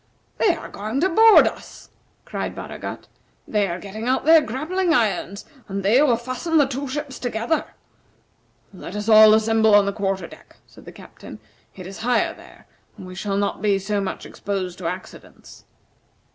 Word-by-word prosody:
"They 365 -6 +3
are 320 - -9
going 215 +6 -4
to 375 - +2
board 445 +5 +7
us," - - -7 0.3
cried - - -5
Baragat. - - -8 0.4
"They 210 -2 0
are 170 -1 -4
getting 210 +4 -7
out 260 +2 0
their 320 0 +7
grappling 320 - -1
irons, 200 - -1 0.2
and 195 0 -4
they 225 +8 +4
will 255 -6 +3
fasten 255 +7 -2
the 290 - +5
two 275 +1 -5
ships 280 0 -5
together." 240 +5 -2 1.1
"Let 205 +3 -7
all 215 -1 +8
assemble 220 -1 +3
on 205 -1 +5
the 200 - -2
quarter 195 -2 -2
deck," - - -16
said - - -18
the - - -10
Captain. - - -13 0.4
"It 185 - -10
is 195 +3 -9
higher 245 +2 0
there, - - -17 0.3
and - - -10
we 185 - -10
shall 195 +1 -3
not 200 -1 -2
be 205 -2 +2
so 200 +1 -2
much 195 - -5
exposed 190 -3 -5
to 175 - -4
accidents." 180 +2 -10
220 Hz, 175 wpm, -22 LUFS, 195-265 Hz, 1.1 s, all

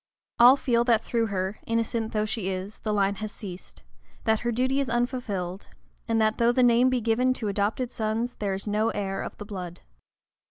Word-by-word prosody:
All 245 +3 +9
feel 240 -4 +1
that 230 -2 +3
through 230 -1 0
her, 190 0 -3
innocent 230 0 -1
though 215 -1 0
she 215 -3 -2
is, 190 +2 -5
the 215 - -3
line 200 -1 +2
has 215 0 -5
ceased; 190 -5 -9 0.4
that 220 -1 +2
her 240 - -1
duty 260 +4 +1
is 275 -2 -1
unfulfilled; 225 -7 -2 0.4
and 225 -1 +1
that, 215 0 +1
though 235 0 +4
the 255 +1 +3
name 245 +1 +5
be 255 -1 0
given 245 +3 +2
to 215 -4 -3
adopted 210 +5 -1
sons, 225 +2 -2
there 200 -2 -1
is 195 - -4
no 210 +2 +1
heir 195 -1 -3
of - - -7
the 205 - -8
blood. 180 -4 -7
220 Hz, 200 wpm, -26 LUFS, 200-240 Hz, 0.4 s, All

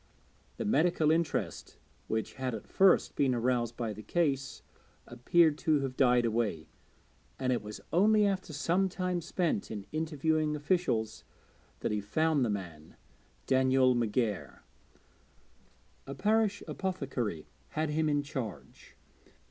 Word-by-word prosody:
The - - -3
medical 170 -6 +3
interest 165 -1 -2 0.3
which 110 0 -2
had 130 -3 -3
at 110 - -8
first 190 -1 +3
been 130 -3 +2
aroused 120 -1 0
by 115 -3 -2
the 105 - -9
case 135 - -1 0.4
appeared 150 +6 +2
to 155 -3 +2
have 135 -2 -3
died 125 -2 +4
away; 105 -9 -1 0.7
and 130 -1 0
it 120 - -1
was 105 0 -8
only 210 +4 +4
after 190 -4 -1
some 175 +6 +1
time 180 -1 -2
spent 180 +5 -1
in 105 -3 -6
interviewing 155 0 0
officials 145 - -1 0.6
that - - -1
he 105 - 0
at - - -8
last 105 - -25
found 155 -3 +3
the 120 - 0
man, 85 -7 -6 0.5
Daniel 130 -1 +4
McGair. 115 -2 -1 1.5
A 140 - -6
parish 210 +3 +1
apothecary 135 - -3 0.2
had 155 -1 -2
him 155 +1 +1
in 145 -1 +1
charge. 130 - -7
140 Hz, 135 wpm, -31 LUFS, 120-165 Hz, 1.5 s, died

